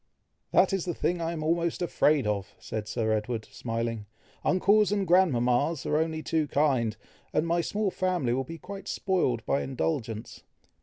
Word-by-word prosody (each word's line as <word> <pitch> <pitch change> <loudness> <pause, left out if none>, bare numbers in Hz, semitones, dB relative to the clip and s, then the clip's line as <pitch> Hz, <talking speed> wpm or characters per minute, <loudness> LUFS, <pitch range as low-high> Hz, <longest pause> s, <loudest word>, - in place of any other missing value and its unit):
"That - - +4
is 195 -3 0
the 175 - -2
thing 175 0 0
I 165 0 -1
am 160 -2 -4
almost 170 +1 0
afraid 155 -5 +2
of!" 100 -2 -2
said 110 -1 -5
Sir 110 0 -1
Edward, 110 +1 -1
smiling. 115 0 -3 0.4
"Uncles 205 +3 +4
and 200 -1 +1
grandmamas 145 -4 +3
are - - 0
only 160 -1 -1
too 160 -2 0
kind, 130 -7 +1 0.4
and 155 - +2
my 170 +1 +1
small 205 +3 -1
family 180 -11 0
will 135 +2 0
be 165 +6 -8
quite 195 +3 -9
spoiled 130 - 0
by 140 - +1
indulgence." 125 -5 -3
155 Hz, 165 wpm, -28 LUFS, 115-175 Hz, 0.4 s, That